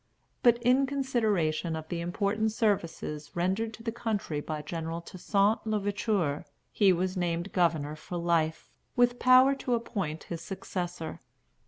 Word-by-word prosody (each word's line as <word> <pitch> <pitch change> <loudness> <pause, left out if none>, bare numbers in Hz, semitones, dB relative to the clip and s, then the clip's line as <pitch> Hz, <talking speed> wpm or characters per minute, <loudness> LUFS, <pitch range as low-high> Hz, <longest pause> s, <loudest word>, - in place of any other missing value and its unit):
But 240 -1 +6
"in 255 +3 +4
consideration 215 - 0
of 160 0 -7
the 170 -1 -2
important 205 +5 0
services 170 -8 -1
rendered 190 +6 0
to 225 - -14
the 225 - -1
country 220 -9 -2
by 150 0 -4
General 165 +1 -4
Toussaint 200 +5 +1
l'Ouverture," 205 -7 0 0.3
he 200 -3 +4
was 185 +1 0
named 175 +1 -1
governor 160 -5 +1
for 175 +3 -6
life, 165 -2 0 0.2
with 245 0 +3
power 255 +2 +7
to 255 -3 -1
appoint 195 -9 -3
his 170 -1 -6
successor. 175 -3 -5
185 Hz, 140 wpm, -29 LUFS, 165-225 Hz, 0.3 s, power